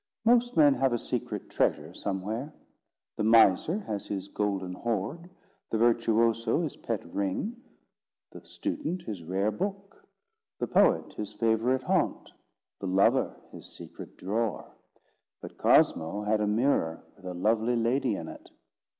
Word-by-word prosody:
Most 240 -2 +3
men 145 -3 +7
have 135 -1 +1
a - - +2
secret - - -4
treasure 75 +3 0
somewhere. 105 +10 -4 0.7
The - - -1
miser 115 - +5
has 105 - -5
his 100 0 -4
golden 95 -3 -2
hoard; 120 - -3 0.4
the 110 - 0
virtuoso 115 +3 +2
his 155 - -4
pet 115 -4 -4
ring; 100 - -3 0.7
the - - -11
student 185 - -4
his 105 - -6
rare 95 +5 -1
book; 195 - -5 0.6
the - - 0
poet - - +3
his 105 0 -6
favourite 115 +4 +1
haunt; - - 0 0.5
the 95 - -4
lover 95 +2 +2
his - - -11
secret - - -11
drawer; 110 +1 -2 0.7
but - - -11
Cosmo 90 +6 +3
had 105 +1 +1
a 105 - +1
mirror 105 -7 +1
with 95 - -18
a 90 -1 -5
lovely 110 +6 +1
lady 120 0 +1
in 80 - -6
it. - - -11
110 Hz, 140 wpm, -28 LUFS, 100-130 Hz, 0.7 s, men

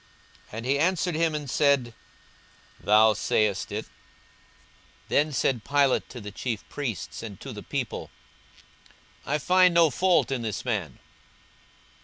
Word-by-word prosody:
And 115 +2 -6
he 140 +2 +1
answered 180 +2 +1
him 160 0 +1
and 150 -1 -4
said, 135 -3 +2 0.9
Thou 110 +1 +5
sayest 105 0 0
it. - - -4
42:023:004 - - -25 1.2
Then 150 +1 +2
said 130 -4 0
Pilate 140 -2 +2
to 125 - -8
the 105 -2 -8
chief 115 +2 -4
priests 120 - -5
and 105 -4 -8
to - - -8
the - - -8
people, - - -4 1.2
I 150 - +1
find 180 +3 +4
no 165 -3 +5
fault 175 -6 +2
in 130 -3 -1
this 110 0 -4
man. 100 - -2
135 Hz, 140 wpm, -26 LUFS, 110-155 Hz, 1.2 s, Thou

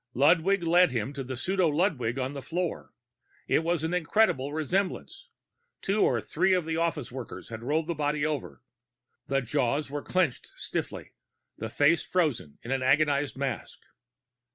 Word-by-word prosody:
Ludwig 175 +7 +4
led 175 +2 +5
him 125 +1 -2
to 140 -1 -4
the 130 0 -5
pseudo 185 +5 +1
Ludwig 145 - 0
on 130 +1 -2
the 140 - -6
floor. 165 +6 -3 0.6
It - - +3
was 165 0 0
an 165 +2 -1
incredible 165 -5 +2
resemblance. 185 - -2 0.5
Two 200 +2 +1
or 120 - +3
three 180 - +1
of 180 -3 0
the 160 0 -2
office 165 -6 -1
workers 120 -8 -8
had 115 -1 -7
rolled 150 +6 0
the 170 - -2
body 150 -1 0
over; 150 -5 -4 0.6
the 135 -1 +1
jaws 130 +4 0
were 145 0 -3
clenched 175 -8 0
stiffly, - - -4 0.5
the 110 - -4
face 145 +8 +3
frozen 150 - -1
in 120 - -6
an 135 -1 0
agonized 140 +1 +2
mask. 135 -4 -4
150 Hz, 160 wpm, -28 LUFS, 130-170 Hz, 0.6 s, led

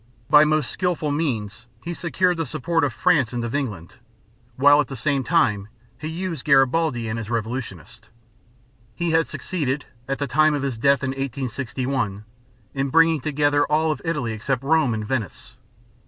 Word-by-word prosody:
By 150 +1 +8
most 155 -3 +1
skillful 175 -5 -1
means 120 -7 -3 0.2
he 175 - -4
secured 180 +1 0
the 165 - -1
support 160 +6 -1
of 145 - +1
France 130 -1 +2
and 120 -1 -2
of 120 - -5
England, 105 - -4 0.6
while 145 +3 +6
at 145 - -4
the 135 - -7
same 135 +2 0
time 105 -4 +1 0.3
he 155 +5 -7
used 165 -2 -4
Garibaldi 135 -3 +2
and 110 +1 -3
his 110 -1 -6
revolutionists. 115 -1 -5 0.9
He 170 +5 -1
had 160 0 +2
succeeded, 150 -6 -3 0.2
at 135 0 -2
the 145 - -2
time 155 +1 +3
of 140 - -3
his 130 -5 -3
death 140 +2 +3
in 130 - 0
1861, 130 -4 -3 0.5
in 135 0 -1
bringing 165 0 +4
together 145 0 +1
all 155 +1 +2
of 150 - -4
Italy 145 -9 -2
except 125 +4 -2
Rome 145 -5 +2
and 110 -1 -4
Venice. 115 -5 -4
140 Hz, 170 wpm, -23 LUFS, 120-155 Hz, 0.9 s, By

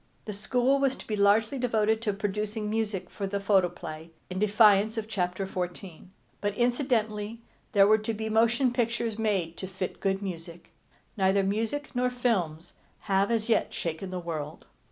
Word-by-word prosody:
The 210 - -4
school 250 +6 +1
was 275 -1 +2
to - - -12
be 215 - -2
largely 210 +6 +3
devoted 220 -2 +1
to 220 -3 0
producing 210 +1 -3
music 215 -4 -1
for 200 - -4
the 200 +1 -2
photoplay, 175 -5 0 0.2
in 185 - -3
defiance 210 +1 +4
of 220 -1 -2
chapter 185 -2 -2
fourteen. 180 -1 -6 0.3
But 205 0 -1
incidentally 230 -3 0 0.3
there 200 -2 +7
were 215 +2 +5
to 215 +2 -3
be 220 +1 -3
motion 235 +3 +3
pictures 230 -2 -1
made 190 -7 0
to 190 - -5
fit 185 0 -5
good 195 0 0
music. 170 -2 -7 0.5
Neither 195 0 +3
music 225 +9 -1
nor 250 0 +2
films 185 -10 -1 0.3
have 195 -1 +1
as 225 -1 0
yet 230 - +1
shaken 170 +3 -4
the 185 - -4
world. 160 -3 -5
210 Hz, 165 wpm, -28 LUFS, 190-225 Hz, 0.5 s, there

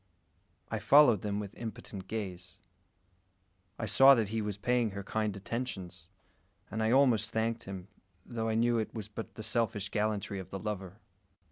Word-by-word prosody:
I - - -1
followed 140 -8 +6
them 105 -1 -2
with 105 0 -6
impotent 105 -4 -7
gaze. 95 -4 -5 1.2
I 110 - -3
saw 135 +6 +8
that 110 -5 0
he 110 +1 -1
was 105 -2 -3
paying 120 +1 +1
her 100 0 -6
kind 105 0 -2
attentions; 95 -6 -5 0.6
and 110 - -2
I 110 - +2
almost 120 -4 +4
thanked 115 +1 -1
him, 95 -1 -7 0.4
though 115 -2 -3
I 110 - 0
knew 120 +1 +3
it 110 - -4
was 110 -3 -5
but 110 +1 -8
the 110 - -7
selfish 105 -3 0
gallantry 105 -2 -1
of 95 - -8
the 95 - -5
lover. 100 -2 -5
110 Hz, 165 wpm, -31 LUFS, 100-115 Hz, 1.2 s, saw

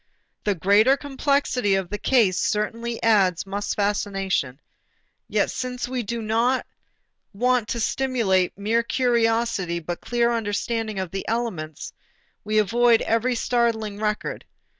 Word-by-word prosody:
The 205 -2 +1
greater 205 - +4
complexity 275 -6 0
of 190 -2 -2
the 210 - -3
case 220 -9 +3
certainly 230 +2 -2
adds 195 -6 +3
much 200 +1 -3
fascination. 195 - -1 0.7
Yet - - +1
since 250 -1 -4
we 255 0 -2
do 230 +1 -4
not 230 +4 +1 0.7
want 245 0 +2
to 235 - -3
stimulate 220 -8 +1
mere 220 +3 +1
curiosity 230 -7 +1
but 170 +1 -5
clear 240 0 +1
understanding 225 0 -2
of 185 -2 -3
the 195 0 -5
elements, 195 -10 -3 0.5
we 215 +1 -1
avoid 230 +3 +4
every 230 +3 +1
startling 225 -4 0
record. 210 -1 -2
220 Hz, 125 wpm, -24 LUFS, 200-240 Hz, 0.7 s, greater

